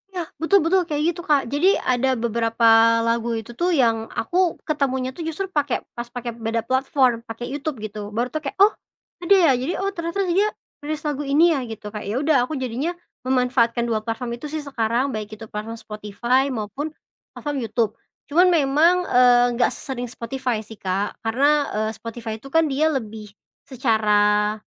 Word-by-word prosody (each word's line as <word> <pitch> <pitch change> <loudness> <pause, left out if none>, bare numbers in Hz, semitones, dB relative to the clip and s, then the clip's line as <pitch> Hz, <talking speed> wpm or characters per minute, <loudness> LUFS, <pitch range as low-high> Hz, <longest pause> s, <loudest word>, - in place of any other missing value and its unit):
Nah, 360 -3 -4 0.2
betul 395 +5 +4
betul, 370 +3 +3
kayak 295 -1 -1
gitu, 345 - -8
Kak. 295 -5 +2
Jadi, 300 - +3
ada 255 +1 +1
beberapa 230 0 +2 0.4
lagu 230 0 0
itu 225 +2 -7
tuh 345 +9 0
yang 230 -7 +2
aku 350 +8 0
ketemunya 265 -4 -1
tuh - - -7
justru 325 +4 -3
pakai 290 -8 -1
pas 240 0 -6
pakai 240 -1 -5
beda 230 0 -2
platform, 260 -2 +2
pakai 230 +1 -7
YouTube, 295 -1 -3
gitu. 210 -1 -6
Baru 235 +3 -1
tau, 310 - -2
kayak, 275 - -5
"Oh, 410 +2 +6 0.5
ada 395 +3 +5
ya? 335 -6 +5
Jadi, 260 +8 -2
oh 390 - -1
ternyata 340 +3 -2
dia 390 +5 +2 0.3
rilis 305 +1 -3
lagu 295 -1 -1
ini, 305 +5 +4
ya?" 285 - 0
gitu. 220 -1 -8
Kayak 210 -2 -6
ya - - -2
udah, 300 +2 +2
aku 310 - -3
jadinya 260 +6 -2 0.3
memanfaatkan 250 -2 +1
dua 225 -2 -1
platform 235 +2 -4
itu 295 +5 -8
sih 305 0 -5
sekarang, 250 0 0
baik 215 0 -6
itu 225 - -9
platform 215 +2 -6
Spotify, 230 +6 -1
maupun 235 +6 -4 0.5
platform 290 -2 -3
YouTube. 225 -2 0 0.4
Cuman 345 +5 +4
memang, 315 +1 +4
eee, 245 -2 +5
nggak 245 - +3
sesering 245 -2 -6
Spotify 250 0 -3
sih 220 - -11
Kak, 195 +1 -3
karena, 280 +6 +2
eee, 215 0 0
Spotify 230 -1 -6
tuh 275 - -11
kan 325 +1 +4
dia 300 +2 +1
lebih 220 -6 -5 0.4
secara 210 -4 +2
255 Hz, 180 wpm, -22 LUFS, 225-300 Hz, 0.5 s, Oh